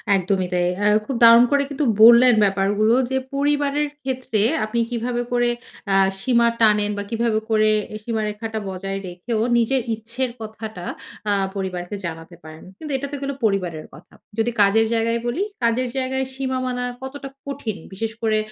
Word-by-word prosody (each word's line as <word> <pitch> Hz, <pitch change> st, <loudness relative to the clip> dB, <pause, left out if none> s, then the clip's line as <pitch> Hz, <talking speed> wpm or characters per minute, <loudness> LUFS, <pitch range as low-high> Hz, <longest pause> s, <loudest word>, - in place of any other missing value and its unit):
একদমই 185 Hz, 0 st, 0 dB
তাই। 175 Hz, 0 st, +1 dB
অ্যা 205 Hz, +1 st, +1 dB, 0.2 s
খুব 270 Hz, -, -3 dB
দারুণ 230 Hz, +1 st, +9 dB
করে 285 Hz, 0 st, +3 dB
কিন্তু 285 Hz, +1 st, -2 dB, 0.2 s
বললেন 240 Hz, +2 st, +8 dB
ব্যাপারগুলো 205 Hz, +3 st, +2 dB, 0.2 s
যে, 265 Hz, -, +1 dB, 0.2 s
পরিবারের 290 Hz, +1 st, +1 dB, 0.2 s
ক্ষেত্রে 255 Hz, -5 st, -1 dB, 0.2 s
আপনি 235 Hz, +2 st, -2 dB
কিভাবে 240 Hz, 0 st, -2 dB
করে 240 Hz, 0 st, +2 dB, 0.4 s
আ -, -, +4 dB, 0.2 s
সীমা 235 Hz, +1 st, +3 dB
টানেন। 210 Hz, -1 st, +4 dB
বা 205 Hz, -, -3 dB
কিভাবে 230 Hz, -1 st, 0 dB
করে 215 Hz, -1 st, +3 dB, 0.3 s
এ -, -, -3 dB
সীমারেখাটা 220 Hz, 0 st, -3 dB
বজায় 195 Hz, +1 st, -4 dB
রেখেও, 180 Hz, +6 st, -4 dB, 0.2 s
নিজের 250 Hz, +3 st, +2 dB
ইচ্ছের 235 Hz, +4 st, -3 dB
কথাটা 215 Hz, -4 st, -7 dB, 0.5 s
আ -, -, +3 dB, 0.2 s
পরিবারকে 185 Hz, 0 st, -4 dB
জানাতে 165 Hz, +1 st, -7 dB
পারেন। 155 Hz, 0 st, -12 dB, 0.2 s
কিন্তু 305 Hz, -2 st, -6 dB
এটা 280 Hz, +1 st, -4 dB
তো -, -, -3 dB
গেল 280 Hz, 0 st, -2 dB
পরিবারের 180 Hz, -7 st, -1 dB
কথা। 155 Hz, +5 st, -16 dB, 0.2 s
যদি 225 Hz, +2 st, +1 dB
কাজের 210 Hz, +3 st, +4 dB
জায়গায় 230 Hz, +1 st, +1 dB
বলি। 290 Hz, +11 st, -1 dB, 0.2 s
কাজের 235 Hz, +2 st, +1 dB
জায়গায় 265 Hz, 0 st, -1 dB
সীমা 260 Hz, -1 st, -2 dB
মানা 250 Hz, -1 st, -2 dB, 0.2 s
কতটা 275 Hz, +1 st, -7 dB, 0.2 s
কঠিন? 275 Hz, -7 st, -4 dB, 0.2 s
বিশেষ 220 Hz, +3 st, -3 dB
করে 220 Hz, -1 st, +2 dB
225 Hz, 160 wpm, -22 LUFS, 205-255 Hz, 0.5 s, দারুণ